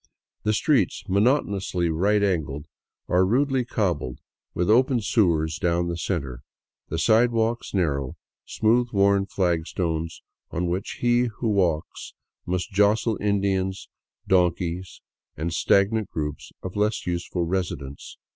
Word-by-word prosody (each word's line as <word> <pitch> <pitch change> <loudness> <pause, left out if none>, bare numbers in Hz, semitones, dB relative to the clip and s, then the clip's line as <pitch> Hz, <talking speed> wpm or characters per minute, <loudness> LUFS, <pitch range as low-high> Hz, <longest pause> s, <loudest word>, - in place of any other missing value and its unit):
The 105 - +1
streets, 120 - +1
monotonously 100 - +1
right 100 +6 +2
angled, 75 -7 -1 0.4
are 90 +1 +3
rudely 130 +6 +2
cobbled, 90 - -2 0.4
with 90 - 0
open 125 +3 +4
sewers 85 -8 +1
down 85 0 +1
the 85 - -2
center, 70 -8 -3 0.5
the 80 - -2
sidewalks 115 +4 +2
narrow, 70 -9 -1 0.3
smooth 120 +3 +2
worn 100 0 +3
flagstones 85 -2 -2 0.3
on 85 +2 -2
which 95 +2 -3
he 120 0 +3
who 115 - -1
would - - +2
walk 85 -5 +2 0.6
must 90 +4 -2
jostle 105 +3 +2
Indians, 95 -2 0 0.4
donkeys, 90 0 0 0.4
and 80 +1 -2
stagnant 100 +3 +2
groups 75 -2 -5
of 95 - -6
less 105 +1 0
useful 85 0 -2
residents. 85 -6 -4
95 Hz, 120 wpm, -24 LUFS, 85-105 Hz, 0.6 s, open